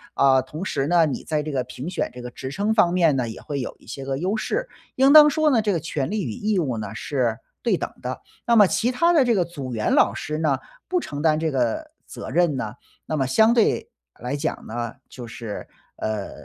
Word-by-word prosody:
啊， 135 -1 +5
同 150 +8 -7
时 140 -6 -1
呢， 170 0 +4
你 145 -4 -3
在 155 -2 -1
这 155 - -4
个 130 -3 0
评 125 +5 -7
选 185 - -2
这 125 - -9
个 125 0 -7
职 130 +2 -7
称 205 +7 0
方 210 -6 +4
面 170 -5 +3
呢， 125 -3 -1
也 110 - -8
会 145 -1 -4
有 - - -5
一 - - -21
些 135 +3 -6
个 135 0 -2
优 185 +8 -1
势， - - -2 0.3
应 270 +2 +5
当 300 -1 +10
说 310 +1 +2
呢， 235 -4 +4
这 210 -1 0
个 170 - 0
权 150 -4 -3
利 210 -1 -1
与 120 - -3
义 210 - -1
务 130 -9 -1
呢， 105 -2 -5
是 125 -6 -1 0.2
对 - - +1
等 - - -3
的。 - - -5 0.3
那 235 - +4
么 205 -2 +8
其 235 +6 +1
他 335 +7 +3
的 310 -5 +5
这 235 -2 +3
个 180 -3 +2
组 140 -7 -7
员 110 -2 0
老 100 - +4
师 150 +6 -4
呢， 150 -4 +2 0.3
不 365 -1 +1
承 145 - -6
担 155 -1 +3
这 160 -1 0
个 130 - -1 0.2
责 - - -8
任 170 -5 +2
呢， 110 -3 -4 0.3
那 155 - -2
么 135 - +1
相 220 - +4
对 230 -3 +2 0.3
来 125 +3 -3
讲 155 +2 -3
呢， 120 +1 -4 0.2
就 125 - -9
是， 115 -2 -7 0.3
呃， 110 -2 -3
150 Hz, 260 characters per minute, -23 LUFS, 130-205 Hz, 0.3 s, 当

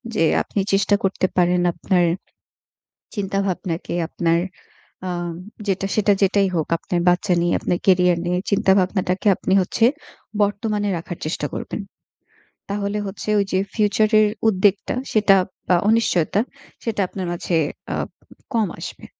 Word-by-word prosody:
যে 165 - +3 0.2
আপনি 205 - -3
চেষ্টা 200 +1 +3
করতে 195 -1 +1
পারেন 180 0 +3
আপনার 180 +1 +1 1.1
চিন্তা 195 -2 -2
ভাবনাকে 175 -3 -3
আপনার 170 -1 +1 0.7
আম 175 -1 -3 0.3
যেটা 195 0 0
সেটা 210 -1 +4
যেটাই 195 0 +3
হোক, 160 -2 0
আপনার 175 +1 -2
বাচ্চা 180 +1 +2
নিয়ে, 175 0 +1
আপনার 175 - -1
ক্যারিয়ার 180 -2 +4
নিয়ে 180 +1 0
চিন্তা 195 -1 +3
ভাবনাটাকে 185 +1 0
আপনি 190 - -1
হচ্ছে 225 +5 +1 0.6
বর্তমানে 205 0 0
রাখার 165 +1 -6
চেষ্টা 155 - -2
করবেন। - - -4 0.9
তাহলে 200 +1 -2
হচ্ছে 195 +2 -7
ওইযে 195 -2 +1 0.2
ফিউচারের 215 0 +3 0.2
উদ্বেগটা, 195 -1 +2 0.2
সেটা 205 -2 +5 0.4
আ - - +6
অনিশ্চয়তা, 205 -5 +2 0.4
সেটা 225 -3 -1
আপনার 190 -2 -5
মাঝে 175 0 -1 0.4
আ - - -1 0.6
কম 225 -2 +3
আসবে। - - -8
195 Hz, 130 wpm, -21 LUFS, 180-205 Hz, 1.1 s, আ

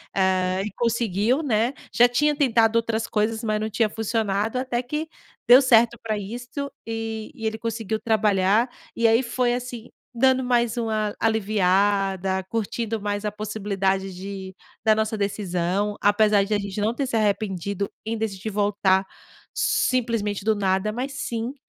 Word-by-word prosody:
eh, 185 0 +1
e 210 - -4
conseguiu, 230 - +1
né. 235 -1 +1 0.2
Já 245 +1 +6
tinha 295 +4 +2
tentado 230 -5 +3
outras 225 -1 -1
coisas, 220 +2 -1
mas 215 -1 0
não 220 - -2
tinha 220 +1 +1
funcionado, 220 0 -1
até 255 -2 -1
que 300 +5 -3 0.4
deu 250 +3 +9
certo 235 -2 +4
pra 215 -2 -1
isto, 245 +7 -6 0.2
e 225 -1 -4
e 225 - -7
ele 220 - -2
conseguiu 220 -1 -3
trabalhar. 210 +1 +2 0.3
E 230 - 0
aí 225 +2 +4
foi, 245 0 0
assim, 245 -1 -6 0.2
dando 260 +2 +3
mais 240 -2 +1
uma 215 -2 -1
aliviada, 195 -3 +1
curtindo 225 0 -2
mais 205 0 -2
a 210 - -1
possibilidade 195 -2 -2
de 190 0 -7 0.3
da 220 - +6
nossa 220 0 -1
decisão, 200 0 -1
apesar 205 0 +4
de 205 +2 -2
a 205 - +2
gente 200 0 -4
não 215 +3 +1
ter 275 0 -1
se 250 - -2
arrependido 200 -2 -1 0.2
em 225 +1 -2
decidir 215 -2 -3
voltar 200 -2 +2 0.5
simplesmente 230 -5 0
do 220 - +4
nada, 195 +1 0
mas 260 +4 -4
sim, 235 -2 -3
220 Hz, 155 wpm, -24 LUFS, 200-235 Hz, 0.5 s, deu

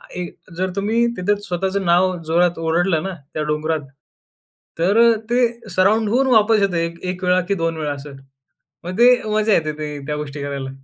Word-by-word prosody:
एक 180 -1 -5
अ, - - -14
जर 185 +2 -1
तुम्ही 220 +4 +1
तिथं 200 +3 +1
स्वतःचं 190 +2 -2
नाव 180 +1 +3
जोरात 170 +1 +1
ओरडलं 165 0 +1
ना, 195 - -4 0.2
त्या 155 - -2
डोंगरात, 150 +1 -1 1.0
तर 195 +7 +3 0.3
ते 240 +1 +2 0.3
सराउंड 205 +4 +2
होऊन 260 +5 +2
वापस 220 -1 +4
येतं 195 -3 +1
एक 170 0 -3
1 185 +1 -9
वेळा 180 0 +3
की - - +3
2 165 -1 -1
वेळा 150 -2 -2
असं. 140 0 -9 0.7
मग 180 +2 -5
ते 245 +1 +8
मजा 215 0 +1
येते 155 -4 +1
ते 150 -1 -4
त्या 150 - -2
गोष्टी 145 -1 -6
करायला. 140 -2 -4
180 Hz, 185 wpm, -20 LUFS, 160-200 Hz, 1.0 s, ते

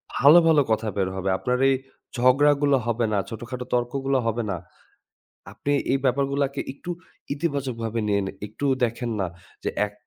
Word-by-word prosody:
ভালো, 150 +5 +8
ভালো, 155 -3 +5
কথা 110 0 +1
বের 95 -1 +1
হবে। 95 0 -2
আপনার 125 +4 0
এই 135 - +4 0.4
ঝগড়াগুলো 140 +3 +4
হবে 120 0 0
না, - - +2
ছোটখাটো 120 +3 -6
তর্কগুলো 135 +3 0
হবে 115 +1 0
না। 90 - -2 1.0
আপনি 145 - -2 0.2
এই 135 - +3
ব্যাপারগুলোকে 140 +1 +1
একটু 175 +6 -8 0.4
ইতিবাচকভাবে 130 -7 -2
নিয়ে 100 -1 +2
নে - - -4
একটু 110 +7 -4 0.2
দেখেন 120 +1 -2
না 95 - +1 0.4
যে - - 0 0.2
১ 100 - -12
125 Hz, 155 wpm, -24 LUFS, 115-140 Hz, 1.0 s, ভালো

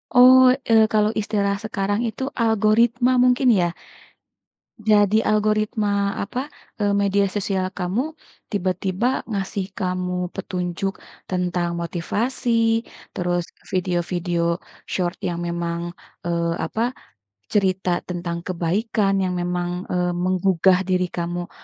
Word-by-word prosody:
Oh, 255 +1 +8 0.2
eee, 225 -1 +7
kalau 215 0 +3
istilah 205 -2 0
sekarang 205 0 -1
itu 225 +4 -4 0.2
algoritma 230 +3 +3
mungkin 250 +1 +3
ya? 175 -1 +1 1.2
Jadi 205 -1 +5
algoritma, 215 0 +1 0.4
apa, 205 +5 -4 0.4
eee, 205 -1 +2
media 200 0 +2
sosial 195 -2 0
kamu 185 +5 0 0.5
tiba-tiba 190 +2 0 0.2
ngasih 195 -2 -2
kamu 180 -1 -2
petunjuk 185 0 -3 0.4
tentang 180 -1 0
motivasi, 225 +6 0 0.2
terus 175 -1 -1 0.3
video-video 175 -1 -1 0.4
short 180 -1 -2
yang 170 -1 -2
memang, 170 0 -2 0.4
eee, 170 -1 0
apa, 235 +9 -2 0.6
cerita 190 -3 +1 0.2
tentang 170 -1 -4
kebaikan 195 +3 0
yang 185 - -1
memang, 175 0 -1 0.2
eee, 180 0 +1
menggugah 185 0 +3
diri 180 -1 +1
kamu 175 0 -4
190 Hz, 105 wpm, -22 LUFS, 175-215 Hz, 1.2 s, Oh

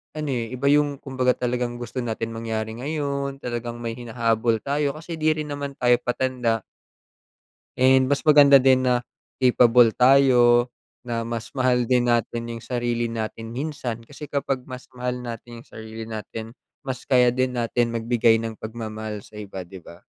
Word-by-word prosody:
ano 155 -1 -3
eh, 120 -2 -3
iba 140 +2 +1
yung 145 -1 +3
kumbaga 130 -2 +1
talagang 125 -1 -2
gusto 125 +2 -5
natin 115 0 -3
mangyari 110 -1 -4
ngayon, 140 0 -3
talagang 120 -1 -5
may 115 0 -4
hinahabol 115 -1 0
tayo 140 0 0
kasi 165 +1 -7
di 155 0 +2
rin 150 -1 -4
naman 145 -1 -4
tayo 125 -1 +3
patanda. 125 -3 0 1.2
And 130 +1 +5
mas 140 - +2
maganda 140 -2 +8
din 130 0 +4
na 125 -1 +2 0.4
capable 120 -2 +5
tayo, 125 -2 +5 0.4
na 115 -1 -2
mas 115 0 -5
mahal 130 -2 +2
din 125 -1 +3
natin 115 0 0
yung 115 -1 -7
sarili 120 -1 -1
natin 115 0 -5
minsan. 130 -5 -4
Kasi 145 +4 -10
kapag 135 -2 -1
mas 130 0 -8
mahal 125 0 -3
natin 115 0 -8
yung - - -28
sarili 110 0 -9
natin 110 +1 -7 0.3
mas 130 -1 -6
kaya 125 -2 +4
din 130 +1 0
natin 120 -1 0
magbigay 115 -1 +2
ng 115 -1 -5
pagmamahal 110 -2 -6
sa 105 - -14
iba 100 -2 -7
'di 90 +2 -10
ba? 85 - -13
120 Hz, 165 wpm, -24 LUFS, 115-130 Hz, 1.2 s, maganda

